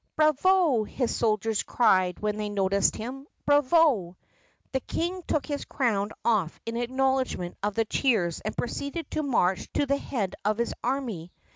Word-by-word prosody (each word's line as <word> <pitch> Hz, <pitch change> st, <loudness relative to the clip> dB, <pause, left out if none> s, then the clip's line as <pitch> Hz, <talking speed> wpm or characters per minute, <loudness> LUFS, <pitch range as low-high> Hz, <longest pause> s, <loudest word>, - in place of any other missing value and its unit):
"Bravo!" 310 Hz, -, +3 dB
his 245 Hz, +3 st, -2 dB
soldiers 220 Hz, -1 st, +1 dB
cried 185 Hz, -6 st, +2 dB
when 210 Hz, 0 st, -1 dB
they 210 Hz, -1 st, -2 dB
noticed 200 Hz, -1 st, +2 dB
him. 265 Hz, +5 st, -7 dB, 0.2 s
"Bravo!" 290 Hz, -, +3 dB, 0.5 s
The 265 Hz, -, 0 dB
King 350 Hz, +7 st, -3 dB
took 305 Hz, -, 0 dB
his 290 Hz, -2 st, -3 dB
crown 215 Hz, -7 st, 0 dB, 0.2 s
off 210 Hz, -8 st, +1 dB
in 230 Hz, -, -4 dB
acknowledgment 260 Hz, -6 st, 0 dB
of 205 Hz, 0 st, -1 dB
the 225 Hz, -, +2 dB
cheers 210 Hz, -, +1 dB
and 215 Hz, -, -4 dB
proceeded 280 Hz, +7 st, -4 dB
to 310 Hz, -, -1 dB
march 195 Hz, -10 st, 0 dB
to 290 Hz, -, +1 dB
the 280 Hz, 0 st, +1 dB
head 220 Hz, -10 st, -3 dB
of 210 Hz, +1 st, +1 dB
his 235 Hz, 0 st, -1 dB
army. 235 Hz, -10 st, -2 dB
235 Hz, 155 wpm, -27 LUFS, 205-280 Hz, 0.5 s, Bravo